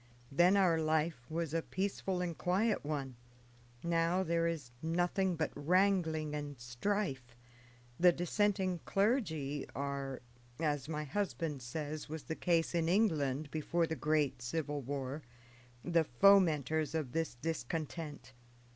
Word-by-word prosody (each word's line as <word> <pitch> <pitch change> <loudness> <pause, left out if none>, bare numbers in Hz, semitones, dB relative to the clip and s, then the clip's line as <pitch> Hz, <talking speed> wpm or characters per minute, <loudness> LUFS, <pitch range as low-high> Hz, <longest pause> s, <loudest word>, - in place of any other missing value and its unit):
Then 175 +7 +5
our 175 -4 +4
life 155 -5 0
was 160 -1 -2
a 165 - +1
peaceful 190 0 -2
and 175 -2 -2
quiet 185 - +1
one; 140 -4 -3 0.7
now 170 +2 +2
there 170 -1 +1
is 155 -7 -4
nothing 175 +3 +1
but 160 -1 -1
wrangling 160 -1 +2
and 145 -3 -5
strife. 130 - -2 0.6
The 180 0 +7
dissenting 185 +1 0
clergy 160 - 0
are, 140 -2 -3 0.4
as 150 -3 -1
my 150 -1 -2
husband 160 -3 -2
says 150 +4 -5
was 155 -1 -5
the 160 - -4
case 170 -1 +1
in 165 -1 +1
England 155 -8 +1
before 165 +2 0
the 160 - -3
great 150 -5 +1
civil 145 +3 -2
war, 140 +2 -4 0.6
the 170 -2 +3
fomenters 155 -1 +4
of 150 -6 -2
this 165 -3 -1
discontent. 150 -1 -4
160 Hz, 130 wpm, -34 LUFS, 145-175 Hz, 0.7 s, The